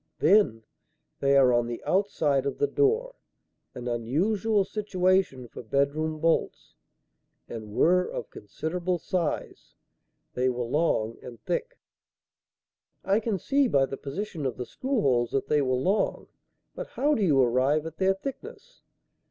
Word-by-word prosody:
"Then, 155 - +3 0.6
they 140 0 +3
are 130 -2 +5
on 120 0 +2
the 120 0 -6
outside 155 -8 +1
of - - -3
the - - +2
door 450 +4 +1 0.6
an 125 0 -6
unusual 190 - 0
situation 185 - 0
for - - -10
bedroom 140 +6 0
bolts 165 +1 0 0.7
and 110 -2 -8
were 180 +2 +3
of - - -6
considerable 175 - -3
size. 170 -2 -3 0.6
They 125 +1 +1
were 125 -1 -2
long 115 -5 0
and 120 -2 -10
thick." - - -3 1.3
"I 195 +3 +2
can 225 -3 -1
see, 275 - +2
by 135 - +3
the 135 - -6
position 160 +4 -5
of 125 - -5
the 125 - -4
screw 260 - -2
holes, 120 -3 +2
that 135 - -1
they 150 -1 +3
were 130 -2 +1
long; 185 +12 0 0.5
but - - -6
how 295 +2 0
do 225 - 0
you 155 -8 +3
arrive 130 +5 +2
at 160 0 -8
their 190 0 +2
thickness?" 275 - -9
155 Hz, 145 wpm, -27 LUFS, 130-195 Hz, 1.3 s, are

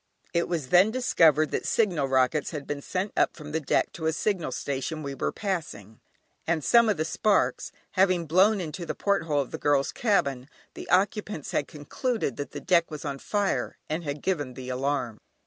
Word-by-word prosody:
It 170 0 +1
was 160 -7 -3
then 180 +6 +6
discovered 165 - +3
that - - -2
signal 175 -11 +1
rockets 130 +3 +2
had 150 -4 -6
been 145 -1 -4
sent 185 +6 -3
up - - +2
from 150 -2 -9
the 160 - 0
deck 150 - +1
to 160 -2 -3
a 160 - +1
signal 175 -4 -1
station 140 +4 -3
we 140 -1 -4
were - - -2
passing, 150 - -5 0.5
and 165 -2 0
some 235 -2 +5
of 210 - +1
the 155 - 0
sparks 205 +5 +1 0.2
having 185 -3 +2
blown 190 +7 +4
into 175 +1 -5
the 170 - -4
porthole 165 -8 +1
of 135 - -7
the - - -5
girls' 145 -1 +2
cabin, 140 - 0 0.2
the - - -9
occupants 195 -3 0
had 145 - 0
concluded 155 - -3
that 145 - -4
the - - -7
deck 170 -2 +2
was 150 -2 -7
on 140 -1 -4
fire, 205 +4 -1
and 160 +3 -3
had 145 -1 -5
given 145 -9 -1
the 130 0 -7
alarm. 130 -3 -2
160 Hz, 195 wpm, -27 LUFS, 140-190 Hz, 0.5 s, then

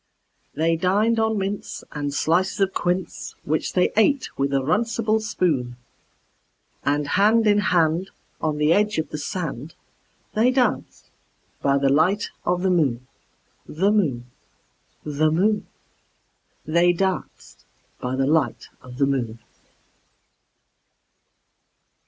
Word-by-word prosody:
They 165 +2 +1
dined 210 +6 +2
on 220 -1 +1
mince 195 +1 -4
and 145 -1 -3
slices 175 +7 0
of 195 -1 +1
quince, 180 0 -3
Which 155 +2 -1
they 180 - +2
ate 255 +6 +2
with 140 0 -1
a 140 - +2
runcible 220 - 0
spoon; 145 - -1 1.1
And 145 0 0
hand 220 +4 +3
in 205 -1 +4
hand, 180 -2 +1 0.3
on 155 -1 -1
the 150 +2 +3
edge 210 +2 +1
of 160 - -2
the 150 - -4
sand, 155 -2 -5 0.6
They 225 +3 +3
danced 255 -1 -1 0.5
by 140 0 +2
the 140 0 +2
light 185 +8 +2
of 180 +1 0
the 190 - +2
moon, 135 -8 +1 0.6
The 190 +7 +1
moon, 145 - 0 0.8
The 150 +1 +1
moon, 200 +6 +1 1.0
They 170 +3 +3
danced 190 +1 -4 0.4
by 125 +1 -3
the 135 0 +1
light 145 -4 0
of 125 -1 -12
the 140 - +3
moon. 125 -5 -2
170 Hz, 120 wpm, -23 LUFS, 145-205 Hz, 1.1 s, in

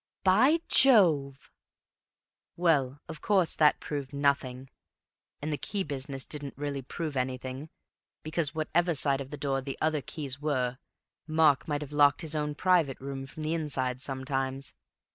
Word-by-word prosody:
"By 255 - +4
Jove!" 160 - +4 1.0
"Well, 145 -6 +2
of 160 -2 -8
course 190 -5 +2
that 150 -1 +4
proved 145 -2 -5
nothing; 135 -2 -1 0.7
and 155 +1 -2
the 145 - -3
key 200 -2 -3
business 135 -3 -4
didn't 145 -2 -3
really 140 -1 -3
prove 150 +3 -5
anything, 130 +3 -4 0.5
because 155 -1 -2
whatever 165 +2 +1
side 140 -1 +1
of 135 - -8
the 150 - -7
door 135 -2 -1
the 135 0 -6
other 155 -1 0
keys 140 -2 -4
were, 130 -4 -1 0.5
Mark 155 -3 +3
might 145 -1 -2
have 150 0 -8
locked 145 -1 +4
his 160 -2 -2
own 150 -1 -2
private 170 -6 +2
room 135 0 -6
from 155 +3 -8
the 155 +1 -1
inside 135 -6 -2
sometimes. 135 0 -3
145 Hz, 150 wpm, -29 LUFS, 135-155 Hz, 1.0 s, By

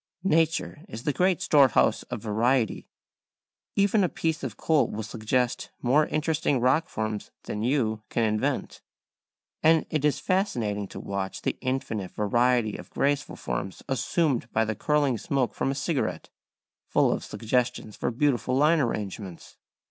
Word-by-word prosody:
Nature 165 -3 +1
is 115 - -7
the 150 - 0
great 185 +2 +2
storehouse 140 -9 +4
of - - -4
variety; 115 +2 +1 0.9
even 200 +1 +3
a 180 - +2
piece 160 -1 -2
of 120 -7 -5
coal 155 -3 +2
will 110 - -4
suggest 120 +3 -1
more 145 +5 +3
interesting 155 -3 0
rock 135 +8 +2
forms 110 -1 -3
than 105 - -4
you 115 -3 +1
can 115 - 0
invent. 110 -1 -1 0.8
And 160 0 +4
it 155 -2 0
is 150 -1 +3
fascinating 115 - 0
to - - -9
watch 100 -1 -4
the - - 0
infinite 120 -7 -2
variety 120 +1 +1
of - - -11
graceful 145 +1 0
forms - - -4
assumed 135 -2 0
by 110 0 +2
the 110 - -1
curling 145 0 +1
smoke 130 +2 0
from - - -1
a 135 - -1
cigarette, 150 -1 -2 0.6
full - - +3
of - - -2
suggestions 120 -1 -1
for - - -1
beautiful 125 0 +1
line 155 +4 +4
arrangements. 100 - -4
125 Hz, 150 wpm, -27 LUFS, 110-150 Hz, 0.9 s, storehouse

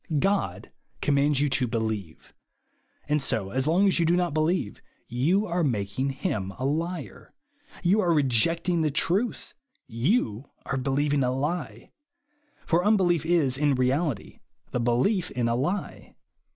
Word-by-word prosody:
God 140 - -1 0.3
commands 145 0 +2
you 145 - +3
to 130 -1 0
believe; 110 -7 -4 0.7
and, 150 0 +1
so 110 -7 -2
long 180 +5 +4
as 190 - +2
you 170 - +3
do 170 - +3
not 175 -4 0
believe, 155 - 0 0.3
you 160 - +1
are 175 -2 -1
making 120 0 -1
him 130 - -3
a 130 - -3
liar, 155 - -4 0.5
you 195 +5 +3
are 175 -3 +2
rejecting 165 +5 +2
the 155 - +2
truth, 190 - -1 0.3
you 120 - -1 0.2
are 135 - -2
believing 140 +2 +1
a 125 - +1
lie; 135 -4 -3 0.7
for 175 +1 +2
unbelief 180 -6 +2
is, 145 -7 +2
in 145 -2 +2
reality, 130 - -1 0.3
the - - -1
belief 130 - +1
in 120 -2 -1
a 115 - +1
lie. 155 +11 -3
145 Hz, 140 wpm, -26 LUFS, 125-175 Hz, 0.7 s, long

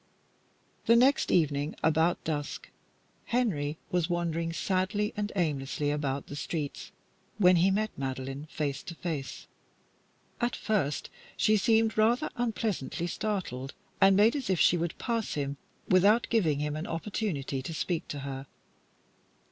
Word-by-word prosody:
The 230 - +7
next 260 +4 +4
evening, 150 -3 +1
about 160 +2 +2
dusk, 145 -2 -4 0.5
Henry 160 -12 0
was 180 -1 +1
wandering 170 -1 -1
sadly 190 +4 0
and 210 0 -2
aimlessly 145 -4 0
about 140 -2 -2
the 145 - -8
streets 145 0 -4 0.5
when 180 -3 +6
he 180 +3 +4
met 215 +3 0
Madeline 135 +2 -4
face 140 -2 -2
to 170 - -8
face. 155 -6 -5 0.9
At 240 0 0
first 190 -10 -1 0.3
she 215 - +4
seemed 220 +1 +3
rather 240 +7 +3
unpleasantly 220 - -2
startled, 175 - -3 0.3
and 195 0 +6
made 215 +5 +5
as 275 -7 -3
if 185 -3 +2
she - - +5
would 170 -1 -2
pass 230 -3 -2
him 140 -1 -2 0.3
without 200 +5 +5
giving 170 -11 +3
him 150 0 -2
an 155 +2 -4
opportunity 165 -7 -2
to 130 - -6
speak 165 +1 -2
to 145 - -5
her. 135 0 -6
170 Hz, 140 wpm, -29 LUFS, 145-210 Hz, 0.9 s, The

